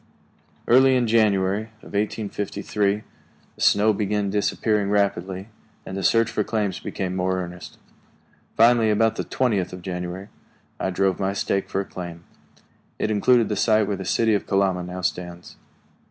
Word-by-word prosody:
Early 130 +2 +6
in 125 -1 +2
January 105 -2 +2 0.2
of - - -13
1853 105 0 -1 0.5
the - - -14
snow 105 +2 +4
began 105 -1 -1
disappearing 105 0 0
rapidly, 100 -1 -1 0.4
and 95 - -6
the 95 - -3
search 115 +4 +3
for 110 -2 0
claims 105 -5 -2
became 95 -2 -4
more 95 0 0
earnest. 90 0 -8 0.8
Finally, 115 -1 +5
about 110 +1 +2
the - - -2
twentieth 110 -8 0
of 90 -1 -9
January, 90 +2 -5 0.5
I - - -1
drove 95 0 0
my 95 0 0
stake 100 0 -1
for 95 - -1
a - - -6
claim. 85 -3 -8 0.7
It 110 - -1
included 115 +2 +3
the 105 - -2
site 110 -1 +3
where 100 - -1
the 95 - -6
city 110 +4 +2
of 100 - -1
Kalama 95 -2 +1
now 90 +1 -6
stands. 90 -1 -4
100 Hz, 155 wpm, -23 LUFS, 95-110 Hz, 0.8 s, Early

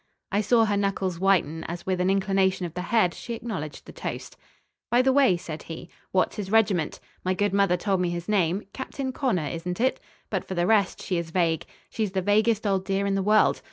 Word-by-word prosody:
I 205 +1 +2
saw 225 +2 +4
her 210 -1 0
knuckles 195 -3 -1
whiten 175 -5 +2
as, 170 +1 -6
with 185 -1 0
an 180 - +2
inclination 195 -1 +1
of 170 - -6
the 180 - -4
head, 180 -1 +2
she 235 - -6
acknowledged 190 -11 -6
the - - -10
toast. - - -6 0.5
"By 245 +1 +4
the 265 0 +3
way," 265 -10 +4
said 160 -2 -7
he, 165 +1 -9 0.2
"what's 185 - +1
his 200 -2 -4
regiment? 205 -7 +2 0.2
My 185 0 0
good 205 +1 0
mother 195 -3 +3
told 190 0 0
me 180 - +1
his 175 0 -4
name. 195 -2 +1
Captain 265 0 -4
Connor, 240 - 0
isn't 175 +3 -4
it? 255 +2 +1 0.3
But - - -1
for 190 - -6
the 175 0 +1
rest 200 -1 +2
she 180 - -1
is 170 -1 -5
vague. 165 -2 0 0.2
She's 215 -4 -2
the 190 -1 0
vaguest 215 +2 +2
old 195 -2 +1
dear 195 0 0
in 200 - 0
the 195 - +1
world. 210 +2 +4
195 Hz, 220 wpm, -26 LUFS, 175-210 Hz, 0.5 s, saw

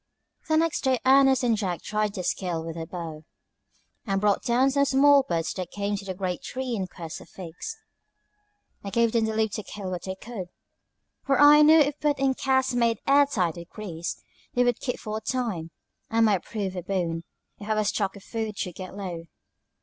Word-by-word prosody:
The 315 - +4
next 330 0 +1
day 260 -2 +3
Ernest 270 0 +5
and 235 -2 +3
Jack 185 -5 -3
tried 210 -1 -1
their 185 - -3
skill 170 -3 -2
with 165 -1 -6
the 165 -1 -5
bow, 160 -3 -7 0.8
and 195 -1 +1
brought 205 0 +2
down 255 +3 +2
some 280 +1 +3
small 280 +1 +6
birds 170 -9 -2
that 185 -2 -5
came 205 0 -2
to 200 - -6
the 190 -1 -4
great 180 -2 -3
tree 255 -1 -4
in 190 -3 -2
quest 165 -2 -8
of - - -15
figs. 185 - -8 1.1
I 200 - -4
gave 230 +2 +2
them 230 -1 +2
leave 220 -1 0
to 215 - -3
kill 195 -3 -6
what 180 - -5
they 190 0 -4
could; 200 -2 -7 0.8
for 275 -1 +1
I 295 +1 +8
knew 310 +2 +7
if 295 -1 +3
put 295 -1 +1
in 270 0 +2
casks 265 -1 +1
made 235 -2 +2
air 280 +1 +5
tight 180 - -1
with 170 0 -9
grease, 170 -6 -5 0.4
they 245 - +4
would 245 -2 +1
keep 250 - -3
for 215 -1 -4
a - - -6
time, 220 -12 -2 0.4
and 225 0 +3
might 200 -5 +2
prove 200 -4 -4
a 180 - -3
boon, 175 -3 -2 0.4
if 205 - -8
our 215 0 +2
stock 200 -1 -1
of 200 - -12
food 220 -2 -4
should 180 - -3
get 185 +2 -8
low. 175 -4 -5
215 Hz, 205 wpm, -26 LUFS, 185-260 Hz, 1.1 s, I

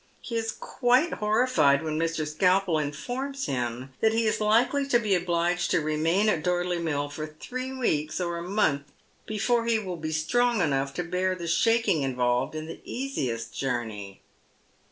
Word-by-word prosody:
He 235 - -6
is 225 -1 -1
quite 250 +10 +1
homlied 210 - +3
when 155 -1 -2
Mr. 165 -2 -1
Skalpel 180 +2 +2
infoiTOs 250 - -3
him 125 0 -3
that 220 0 +4
he 225 0 +1
is 215 - 0
likely 245 +6 +3
to 250 - +4
be 215 -4 0
obliged 175 0 +1
to - - +3
remain 160 +6 +1
at 160 -7 +1
Porlcy 180 -1 0
Mill 145 -3 -1
for 155 +2 -6
three 255 +12 -6
weeks 155 - -1
or 170 -1 -2
a 175 +1 -7
month 145 -9 +1 0.4
before 230 +2 +1
he 230 -1 +3
will 185 -5 -4
be 155 -1 -4
strong 235 +10 +1
enough 140 -4 +1
to 175 - -1
bear 185 +2 0
the 175 -2 -6
shaking 225 -2 +2
involved 125 0 0
in 155 0 -4
the 165 - -9
easiest 125 - -3
journey. 110 -7 -4
175 Hz, 170 wpm, -27 LUFS, 150-225 Hz, 0.4 s, that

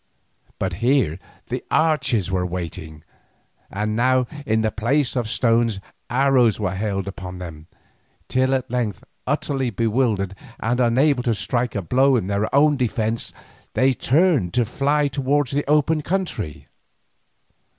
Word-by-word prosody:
But 95 -1 -2
here 120 - +2 0.3
the - - -3
archers 130 - +1
were 90 -1 0
waiting, 85 -4 -6 0.7
and 105 +2 -2
now, 130 +2 +3 0.2
in 110 0 +2
the 110 -1 0
place 125 +6 0
of 120 -3 -1
stones, 115 -3 +2 0.3
arrows 130 -4 +3
were 100 -3 -1
hailed 100 -1 -2
upon 95 -2 -7
them, 80 -3 -9 0.6
till 130 +1 +2
at 130 -3 -3
length, 120 -5 -2 0.2
utterly 135 -3 -1
bewildered 110 -3 0 0.3
and 120 +2 0
unable 130 +3 +3
to 120 -2 0
strike 120 +4 -1
a 100 - -2
blow 130 +9 +3
in 115 - 0
their 100 +2 0
own 145 0 +5
defence, 115 -2 -1 0.4
they 130 +1 +4
turned 135 - +2
to 120 -2 +3
fly 145 +5 +1
towards 140 0 0
the 145 0 -1
open 150 +1 +3
country. 150 - -3
120 Hz, 140 wpm, -22 LUFS, 100-135 Hz, 0.7 s, own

